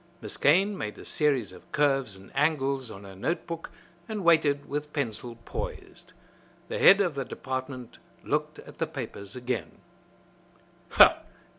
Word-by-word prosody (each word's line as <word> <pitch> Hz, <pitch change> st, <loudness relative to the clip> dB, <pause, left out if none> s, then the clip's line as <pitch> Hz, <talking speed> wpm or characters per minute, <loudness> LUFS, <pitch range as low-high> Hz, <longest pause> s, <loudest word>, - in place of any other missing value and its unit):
Miss -, -, -2 dB
Kane 195 Hz, +8 st, +4 dB
made 105 Hz, -, -5 dB
a -, -, -11 dB
series 140 Hz, -9 st, +1 dB
of 90 Hz, -, -15 dB
curves 135 Hz, -7 st, +1 dB
and 95 Hz, 0 st, -15 dB
angles 135 Hz, -3 st, +1 dB
on 100 Hz, -2 st, -10 dB
her 95 Hz, -1 st, -11 dB
note 160 Hz, -, -2 dB
book 165 Hz, -1 st, -6 dB, 0.4 s
and 215 Hz, -3 st, -3 dB
waited 155 Hz, -4 st, +4 dB
with 150 Hz, +1 st, -4 dB
pencil 120 Hz, -4 st, -3 dB
poised. -, -, -7 dB, 0.6 s
The -, -, -3 dB
head 195 Hz, +2 st, +8 dB
of 180 Hz, -5 st, +1 dB
the 135 Hz, -1 st, -2 dB
department 130 Hz, -1 st, -6 dB, 0.2 s
looked -, -, -1 dB
at -, -, -13 dB
the -, -, 0 dB
papers 100 Hz, +2 st, -7 dB
again. 125 Hz, -2 st, -3 dB
135 Hz, 145 wpm, -28 LUFS, 115-155 Hz, 0.6 s, head